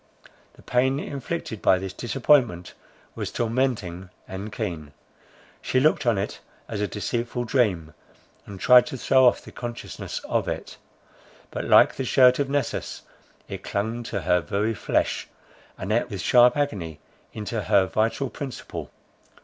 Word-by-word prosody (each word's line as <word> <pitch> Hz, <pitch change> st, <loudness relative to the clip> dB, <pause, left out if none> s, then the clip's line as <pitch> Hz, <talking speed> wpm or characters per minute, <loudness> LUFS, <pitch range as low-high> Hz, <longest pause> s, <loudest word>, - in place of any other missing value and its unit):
The -, -, -19 dB
pain 130 Hz, +2 st, +1 dB
inflicted 140 Hz, -5 st, -5 dB
by 95 Hz, -, +4 dB
this 95 Hz, 0 st, -5 dB
disappointment 120 Hz, -, +1 dB, 0.4 s
was -, -, -5 dB
tormenting 115 Hz, -7 st, -1 dB, 0.2 s
and 100 Hz, +3 st, -6 dB
keen. 85 Hz, -11 st, -5 dB, 0.7 s
She 130 Hz, -, +1 dB
looked 145 Hz, -2 st, +2 dB
on 115 Hz, -4 st, +3 dB
it 95 Hz, -, -3 dB, 0.3 s
as 105 Hz, -2 st, -4 dB
a 105 Hz, -, +1 dB
deceitful 120 Hz, +4 st, -3 dB
dream, 100 Hz, -, 0 dB, 0.5 s
and 100 Hz, -2 st, -9 dB
tried 125 Hz, +5 st, +6 dB
to 130 Hz, -, -5 dB
throw 130 Hz, +1 st, +4 dB
off -, -, +2 dB
the -, -, -10 dB
consciousness 120 Hz, -1 st, -6 dB
of -, -, -1 dB
it; -, -, -5 dB, 0.7 s
but -, -, -4 dB
like -, -, +5 dB
the 135 Hz, -, -1 dB
shirt 125 Hz, 0 st, +5 dB
of 140 Hz, -1 st, 0 dB
Nessus, 140 Hz, -3 st, -2 dB, 0.4 s
it -, -, -6 dB
clung 110 Hz, +4 st, -2 dB
to 100 Hz, -4 st, -3 dB
her 90 Hz, +2 st, +3 dB
very 105 Hz, +5 st, -1 dB
flesh, -, -, -1 dB, 0.5 s
and 95 Hz, +2 st, -4 dB
ate 115 Hz, +3 st, +1 dB
with 100 Hz, -5 st, -5 dB
sharp 125 Hz, +6 st, +5 dB
agony 95 Hz, -, -2 dB, 0.3 s
into 110 Hz, +1 st, -4 dB
her 100 Hz, -3 st, +4 dB
vital 115 Hz, +7 st, -1 dB
principle. 135 Hz, -4 st, -7 dB
115 Hz, 150 wpm, -25 LUFS, 100-125 Hz, 0.7 s, tried